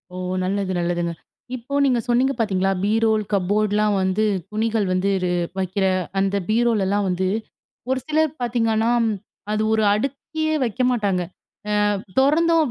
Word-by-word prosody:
ஓ - - -6 0.3
நல்லது, 195 0 -1
நல்லதுங்க. 175 0 -1 0.4
இப்போ 255 +3 -8
நீங்கச் 250 -3 +1
சொன்னீங்க 255 +3 +3
பாத்தீங்களா? 195 -3 +1
பீரோல், 220 +1 +2
கப்போர்ட்லாம் 205 +2 +1
வந்து 190 +3 +1 0.3
துணிகள் 220 0 0
வந்து 185 +2 +1
ரு 180 - +1 0.3
வைக்கிற 190 +1 0 0.3
அந்த 195 +1 +1
பீரோல்லாம் 210 -3 +2
வந்து 185 +1 0 0.6
ஒரு 260 0 +1
சிலர் 310 -1 +2
பாத்தீங்கன்னா, 225 -2 +1 0.6
அது 215 0 0
ஒரு 220 - +2
அடுக்கியே 280 +7 -2
வைக்க 245 +1 -2
மாட்டாங்க. 200 -6 0 0.7
அ - - -1 0.2
தொறந்தோம் 330 +4 +4
215 Hz, 130 wpm, -22 LUFS, 195-245 Hz, 0.7 s, தொறந்தோம்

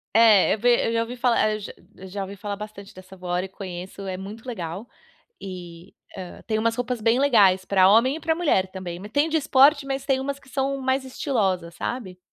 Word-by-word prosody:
É, 220 -3 +6
vê, 240 +2 +3
eu 230 - -1
já 230 - +2
ouvi 235 +2 -7
falar 240 -3 +2
eu 200 -2 -9
já 200 +2 -5
ouvi 195 +1 -8
falar 205 +1 -5
bastante 210 -1 -10
dessa 185 +1 -13
Gowri 180 0 -2
e - - -7
conheço, 185 0 -8
é 185 -1 -4
muito 205 +4 -9
legal, 190 -1 -5 0.5
e 180 -2 -9 0.2
hã, 185 -2 -8
tem 215 - 0
umas 230 +1 +1
roupas 245 -1 -2
bem 230 +3 +2
legais 205 -9 +4
para 190 -1 +4
homem 235 +7 +4
e - - -9
para 320 0 0
mulher 290 - +1
também, 180 -2 -6
me 205 - -8
tem 285 +8 +1
de 320 - +2
esporte, 280 0 +4
mas 270 0 -3
tem 270 -2 +1
umas 280 +1 -4
que 280 -1 -20
são 275 0 -1
mais 265 +1 0
estilosa, 200 - -1
sabe. 185 +1 -5
215 Hz, 210 wpm, -24 LUFS, 190-260 Hz, 0.5 s, É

